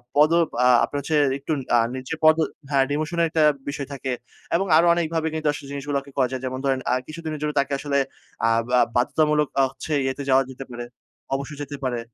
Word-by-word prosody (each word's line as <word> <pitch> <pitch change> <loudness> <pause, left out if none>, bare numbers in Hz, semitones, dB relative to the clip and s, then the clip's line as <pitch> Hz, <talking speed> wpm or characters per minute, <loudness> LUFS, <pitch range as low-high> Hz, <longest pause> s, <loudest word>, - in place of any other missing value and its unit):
পদোব 160 +2 +5 0.2
আ - - +6 0.2
আপনার 145 - -4
হচ্ছে 155 +2 -1 0.2
একটু 140 - -5 0.2
আ - - +6 0.2
নিচের 130 +5 -5
পদো 155 +1 +6 0.3
হ্যাঁ, 135 -1 +4
ডিমোশনের 155 +3 0
একটা 155 -1 +2 0.3
বিষয় 140 -1 -4
থাকে। 130 -1 -4 0.4
এবং 195 +3 +1
আরো 170 - +5
অনেকভাবে 165 -1 -1
কিন্তু 155 -1 -2
আসলে 140 -1 -8
জিনিসগুলাকে 140 0 -3
করা 130 -2 +3
যায়। 130 -1 -4
যেমন 130 0 -3
ধরেন 135 -1 +1
আ - - +3
কিছুদিনের 155 -1 -6
জন্য 150 0 -1
তাকে 140 +1 0
আসলে 140 -1 -1 0.5
আব 115 0 +2
আ - - +6
বাধ্যতামূলক 150 +4 +2
আ - - +5
হচ্ছে 150 +3 -5
ইয়েতে 135 +2 -2
যাওয়া 135 +1 +5
যেতে 130 +1 -8
পারে, 120 0 -6 0.5
অবসরে 140 +1 -4
যেতে 145 0 -6
পারে। 125 -2 -1
145 Hz, 200 wpm, -23 LUFS, 135-155 Hz, 0.5 s, আ